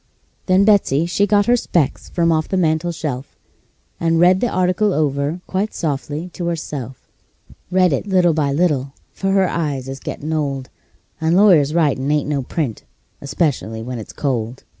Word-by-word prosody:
Then 190 +1 +4
Betsey 190 -8 +3
she 200 +4 +1
got 205 0 +3
her 240 - +4
specs 170 - -1
from 170 -1 +1
off 155 -1 +1
the 190 - 0
mantel 165 0 +1
shelf, 145 -5 -5 0.6
And 165 0 +1
read 180 +2 +5
the 245 - 0
article 185 +2 +1
over 145 +3 -1
quite 195 +3 -2
softly 150 +2 -3
to 175 - -4
herself; 145 -6 -5 0.6
Read 185 -3 +3
it 185 +9 -2
by 190 - -1
little 175 -3 +3
and 140 -1 0
little, 140 -6 +1 0.2
for 195 0 -2
her 195 -1 +3
eyes 145 -7 -2
is 135 +1 -6
gettin' 155 +3 -5
old, 140 -4 -2 0.5
And 160 +2 +2
lawyers' 165 -7 +5
writin' 145 -5 +1
ain't 150 -1 +1
no 145 -2 -1
print, 130 - -3 0.4
especially 140 -7 -2
when 125 0 -5
it's 110 - -9
cold. 125 -3 -3
160 Hz, 170 wpm, -19 LUFS, 140-180 Hz, 0.6 s, read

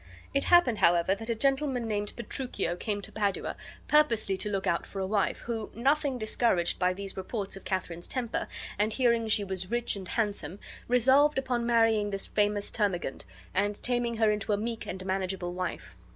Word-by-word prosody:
It 275 - +3
happened, 345 -11 +5
however, 170 +2 +4
that 225 +3 -4
a 230 - +1
gentleman, 270 -1 +1
named 205 -1 -2
Petruchio, 240 -7 -2
came 205 +2 -3
to - - -7
Padua 200 -3 -1 0.3
purposely 230 -10 +3
to 210 - -1
look 195 -1 -2
out 170 - +1
for 195 - -7
a 190 - -1
wife, 200 0 0
who, 225 -3 -4
nothing 275 +3 +1
discouraged 220 -5 +1
by 180 0 +3
these 195 +1 -5
reports 195 +1 -4
of 195 - -11
Katharine's 175 -3 -3
temper, 245 -3 -2 0.3
and 210 +1 +2
hearing 235 -3 +2
she 215 -1 +3
was 190 -1 -1
rich 240 -1 0
and 190 -2 -7
handsome, 205 -4 -2 0.3
resolved 265 +5 +4
upon 245 -3 -1
marrying 225 -3 +3
this 195 -1 +1
famous 205 -1 0
termagant, 190 -9 -1 0.3
and 205 +2 +1
taming 240 -2 0
her 220 -1 +4
into 210 0 -1
a - - +2
meek 230 +2 -4
and 185 0 -5
manageable 190 -2 -2
wife. 180 - -5
210 Hz, 180 wpm, -29 LUFS, 195-240 Hz, 0.3 s, happened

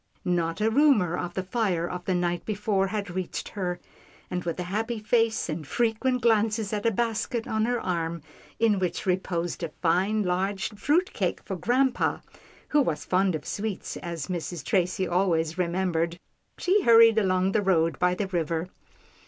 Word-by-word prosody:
Not 170 0 0
a 220 +1 +2
rumour 230 - +4
of 175 0 -4
the 190 - -1
fire 185 -4 0
of 180 0 -6
the 185 - +1
night 175 -1 -1
before 205 -2 0
had 200 -2 -3
reached 185 0 -4
her, 180 -3 -3 0.5
and 180 -1 -2
with 170 +1 -3
a - - -1
happy 220 +6 -2
face, 225 +1 +1
and 155 -2 -4
frequent 240 - 0
glances 220 -2 +2
at 210 +1 0
a - - +3
basket 230 +2 -1
on 220 0 0
her 245 0 0
arm, 170 -4 -2 0.3
in 220 -3 +3
which 180 -2 -2
reposed 180 -2 -1
a 165 - -2
fine, 190 +6 +2
large 190 +2 -1
fruit 295 - +1
cake - - -1
for 190 - -3
grampa, 250 +8 +1 0.5
who 295 - +4
was 165 - -1
fond 185 -1 +2
of 155 - -6
sweets 210 -1 -4
as 170 -4 -5
Mrs. 175 -3 -5
Tracy 185 -2 +1
always 175 -2 +1
remembered, 170 -1 0 0.4
she 390 +3 +2
hurried 230 - +7
along 185 -1 +2
the 215 - +2
road 165 -4 +2
by 180 0 +2
the 205 - -1
river. 170 -2 -2
190 Hz, 170 wpm, -26 LUFS, 175-220 Hz, 0.5 s, hurried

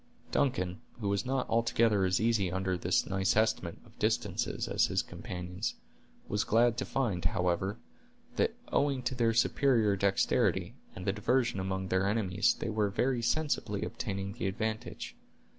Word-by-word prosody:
Duncan, 90 -10 0 0.2
who 105 -3 -1
was 100 +5 0
not 130 -1 0
altogether 115 -3 +2
as 95 0 +2
easy 110 -5 +2
under 95 0 -1
this 90 +1 +1
nice 95 0 +1
estimate 110 -6 +1
of - - -21
distances - - 0
as - - +2
his - - 0
companions, 90 +3 -5 0.5
was 105 +1 0
glad 115 +1 +3
to 130 - -1
find, 105 -10 -1
however, 90 +4 0 0.6
that 225 - +1 0.2
owing 140 -3 +1
to 125 - -1
their 115 -3 +1
superior 115 -4 +3
dexterity, 100 0 +1 0.2
and 95 - -7
the 95 - +1
diversion 115 0 +1
among 95 0 -2
their 95 +1 +2
enemies, 105 +1 +2
they 115 - -4
were 105 -1 +1
very 125 +4 0
sensibly 145 +6 0
obtaining 100 0 -4
the - - -3
advantage. 110 +3 -4
105 Hz, 155 wpm, -31 LUFS, 95-115 Hz, 0.6 s, glad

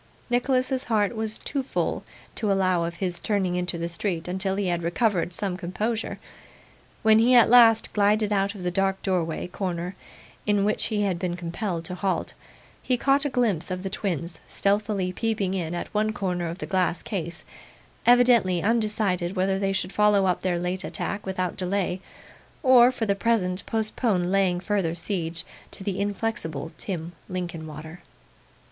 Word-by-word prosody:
Nicholas's 255 +1 +1
heart 215 -1 +1
was 220 -1 -2
too 275 - -3
full 265 - -2 0.3
to 210 -3 0
allow 185 -3 +2
of 170 0 -4
his 180 -1 -2
turning 195 -4 0
into 180 -1 -1
the 170 0 -2
street 170 -1 -3
until 190 +1 -1
he 200 0 -1
had 175 -1 0
recovered 175 +1 +1
some 185 +1 -2
composure. 210 +5 -3 0.9
When 220 0 +6
he 245 +3 +5
at 235 -1 +6
last 230 -2 +6
glided 210 +1 +2
out 200 +1 0
of 190 - -8
the 180 - 0
dark 195 +1 +1
doorway 175 -4 -1
corner 180 -1 -4 0.5
in 205 -1 +3
which 210 - +2
he 210 -2 0
had 185 -4 0
been 175 -1 -2
compelled 170 0 -4
to 180 - -5
halt, 190 +1 -1 0.5
he 250 - +1
caught 275 +3 +2
a - - +1
glimpse 230 - +1
of 185 0 -4
the 195 - -4
twins 170 -4 -3
stealthily 200 -2 0
peeping 205 -3 -1
in 175 -3 -2
at 175 - -5
one 215 +1 +1
corner 180 -4 -2
of 165 +1 -5
the - - -5
glass 185 -2 0
case, 175 -4 -4 0.6
evidently 240 -8 +5
undecided 210 -5 +1
whether 190 +1 +1
they 195 0 0
should 190 -1 -2
follow 210 -2 +4
up 180 -2 +1
their 180 -2 0
late 180 +2 -2
attack 205 -1 -4
without 185 -2 -2
delay, 185 0 -1 0.6
or 255 -2 +7
for 240 -3 -2
the 200 - +2
present 195 -3 0
postpone 215 -4 0
laying 190 -2 +2
further 185 -3 -1
siege 170 -2 -3 0.2
to - - -10
the 195 -1 -2
inflexible 200 -7 -3
Tim 170 -4 -4 0.2
Linkinwater. 160 -2 -6
195 Hz, 165 wpm, -25 LUFS, 180-215 Hz, 0.9 s, or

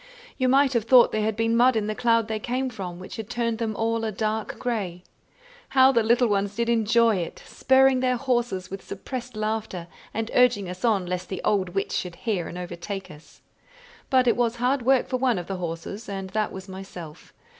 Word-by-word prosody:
You 255 -2 +1
might 275 +1 +4
have 235 -3 +1
thought 245 +1 +6
there 215 - 0
had 215 0 0
been 225 +1 +1
mud 245 +1 +5
in 215 -2 0
the 215 - -2
cloud 230 0 +2
they 220 -1 -2
came 255 +3 -2
from, 185 -6 -6
which 185 - -9
had 220 -1 -6
turned 235 -2 -1
them 220 -2 -2
all 225 +1 0
a 220 - -1
dark 215 +1 -2
grey. 195 -8 -3 0.7
How 260 +1 +8
the 235 -3 +3
little 235 +3 +3
ones 200 -1 0
did 235 +1 0
enjoy 230 -1 +3
it, 170 -2 -5
spurring 265 0 +3
their 255 -1 +1
horses 240 -8 -1
with 195 - -6
suppressed 245 +4 -7
laughter, 215 -5 -3 0.3
and 225 0 -3
urging 245 -6 +3
us 180 +1 -8
on 210 -6 +2
lest 180 0 -4
the 190 - -4
old 190 -3 0
witch 195 - -1
should 180 -2 -3
hear 190 -4 -2
and 175 - -7
overtake 180 +2 -6
us! 150 +1 -16 0.7
But 255 -2 +3
it 235 - +4
was 240 -1 +1
hard 250 +3 +1
work 260 +1 +3
for 255 - -1
one 250 -4 +1
of 175 - -4
the 195 +1 -4
horses, 175 +5 -6
and 195 -1 -5
that 215 -1 -1
was 190 0 -8
myself. 185 -5 -10
220 Hz, 210 wpm, -25 LUFS, 190-240 Hz, 0.7 s, How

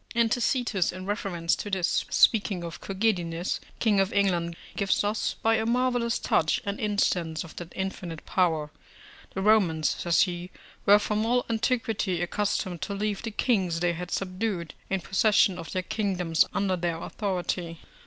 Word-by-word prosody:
And 230 -1 +3
Tacitus, 245 -6 +1
in 185 +1 -8
reference 190 -5 -1
to 205 - -5
this, 190 -3 +1
speaking 200 -5 +3
of 170 -1 -7
Cogidunus, 185 -4 -1 0.2
king 210 -4 +2
of 195 0 +2
England, 175 -4 +1 0.2
gives 200 0 +1
us, 205 +1 -1
by 225 0 +4
a 220 - -1
marvellous 245 -1 +1
touch, 155 - +1
an 200 0 -3
instance 180 -6 0
of 165 - -12
that 175 -1 -7
infinite 185 -4 -5
power: 160 -5 +1 0.6
the 190 - -2
Romans, 185 -8 +3
says 170 -1 +3
he, 180 -1 -1 0.4
were 205 +1 +9
from 210 +1 -1
all 245 +2 +1
antiquity 225 -5 0
accustomed 180 0 -1
to 200 - -3
leave 205 0 -2
the 230 - -4
kings 195 -7 +1
they 175 0 +1
had 175 +1 -6
subdued 185 -2 -2 0.2
in 195 -1 0
possession 195 -1 +3
of 165 -3 -7
their 185 - -1
kingdoms 180 -6 +1
under 195 -2 0
their 170 -2 -2
authority. 175 -3 -3
190 Hz, 160 wpm, -27 LUFS, 175-215 Hz, 0.6 s, were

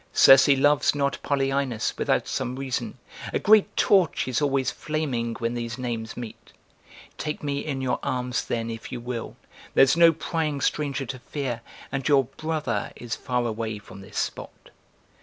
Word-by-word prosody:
Circe 135 0 +8
loves 145 +1 +4
not 140 -1 0
Polyaenos 135 -4 0
without - - 0
some 125 - -2
reason; 135 -1 -3 0.4
a - - +2
great 215 -1 +4
torch 185 -10 +3
is 130 +3 0
always 135 -3 +1
flaming 130 -7 -2
when 115 +1 -2
these 120 0 -4
names 115 -3 -4
meet! 120 -3 -9 0.7
Take 150 0 -4
me 140 -1 -1
in 140 -3 -3
your 130 -1 0
arms 125 -1 -2
then, 115 -1 -2
if 115 0 -8
you - - -4
will; 120 -1 -5 0.4
there's 135 +2 +6
no 170 0 +7
prying 155 -2 -2
stranger 140 -2 -1
to 130 +1 -6
fear, 125 -3 -4 0.3
and 135 -1 -2
your 140 -2 +5
'brother' 135 -4 -3
is 120 -1 -5
far 125 -1 -1
away 110 -1 -3
from 100 -1 -12
this 95 - -10
spot!" - - -5
135 Hz, 160 wpm, -25 LUFS, 120-145 Hz, 0.7 s, Circe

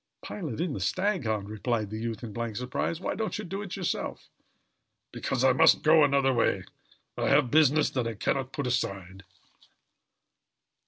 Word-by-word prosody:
"Pilot 155 - -5
in 170 -3 -1
the - - -4
Staghound!" 110 - -1
repeated 110 0 -2
the 110 - -4
youth 115 0 -4
in 110 -3 -6
blank 115 0 -4
surprise. 125 +7 -2
"Why - - -2
don't 220 +2 -3
you 215 - -5
do 195 +3 -5
it 195 -3 -6
yourself?" 185 -3 -4 0.8
"Because 130 -1 -2
I 130 -1 +5
must 125 - +5
go 155 0 +6
another 140 -2 +3
way. 120 - +1 0.5
I - - 0
have 135 -4 +3
business 155 0 +4
that 125 -3 -1
I 115 - -4
can - - 0
not 135 -1 -4
put 140 - -3
aside." 100 -6 -3
130 Hz, 170 wpm, -28 LUFS, 110-155 Hz, 0.8 s, go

